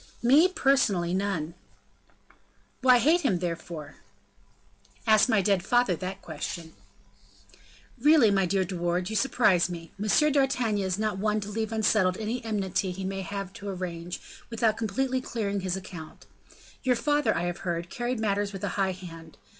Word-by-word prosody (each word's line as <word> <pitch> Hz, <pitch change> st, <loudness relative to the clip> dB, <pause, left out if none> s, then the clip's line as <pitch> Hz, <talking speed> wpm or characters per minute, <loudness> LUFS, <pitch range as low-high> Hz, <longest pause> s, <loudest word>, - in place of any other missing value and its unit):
"Me! 285 Hz, +9 st, +6 dB
personally, 260 Hz, -, +2 dB
none." 185 Hz, -5 st, -1 dB, 1.3 s
"Why 255 Hz, -1 st, +6 dB
hate 315 Hz, +9 st, +3 dB
him, 225 Hz, -, +1 dB
therefore?" 170 Hz, -3 st, -5 dB, 1.1 s
"Ask 220 Hz, +2 st, +5 dB
my 210 Hz, -4 st, +3 dB
dead 195 Hz, -1 st, +2 dB
father 240 Hz, -5 st, +2 dB
that 185 Hz, +3 st, -6 dB
question." 160 Hz, +1 st, -6 dB, 1.3 s
"Really, 285 Hz, -4 st, +5 dB
my 195 Hz, -2 st, +2 dB
dear 190 Hz, +1 st, +1 dB
De 185 Hz, -, -6 dB
Wardes, 175 Hz, +2 st, -1 dB
you -, -, -3 dB
surprise 215 Hz, -8 st, +3 dB
me. 165 Hz, -2 st, -8 dB
M. 300 Hz, +9 st, +3 dB
d'Artagnan 250 Hz, -7 st, +1 dB
is 185 Hz, 0 st, -1 dB
not 215 Hz, -2 st, -1 dB
one 210 Hz, +1 st, +1 dB
to 200 Hz, -, -6 dB
leave 220 Hz, +1 st, -2 dB
unsettled 215 Hz, -4 st, +2 dB
any 225 Hz, +3 st, -3 dB
enmity 195 Hz, -3 st, -1 dB
he 190 Hz, +1 st, -5 dB
may 195 Hz, 0 st, -3 dB
have 195 Hz, +1 st, -5 dB
to 200 Hz, 0 st, -7 dB
arrange, 175 Hz, -2 st, -5 dB, 0.3 s
without 225 Hz, -2 st, +1 dB
completely 255 Hz, +4 st, -1 dB
clearing 205 Hz, -5 st, -2 dB
his 185 Hz, -1 st, -2 dB
account. 175 Hz, -4 st, -10 dB, 0.6 s
Your 255 Hz, -2 st, +2 dB
father, 290 Hz, -4 st, +1 dB
I -, -, -1 dB
have 175 Hz, +1 st, -3 dB
heard, 170 Hz, -1 st, -3 dB
carried 240 Hz, 0 st, -2 dB
matters 205 Hz, -1 st, 0 dB
with 195 Hz, -, -7 dB
a -, -, 0 dB
high 195 Hz, -2 st, 0 dB
hand. 165 Hz, -3 st, -11 dB
200 Hz, 160 wpm, -27 LUFS, 180-230 Hz, 1.3 s, Me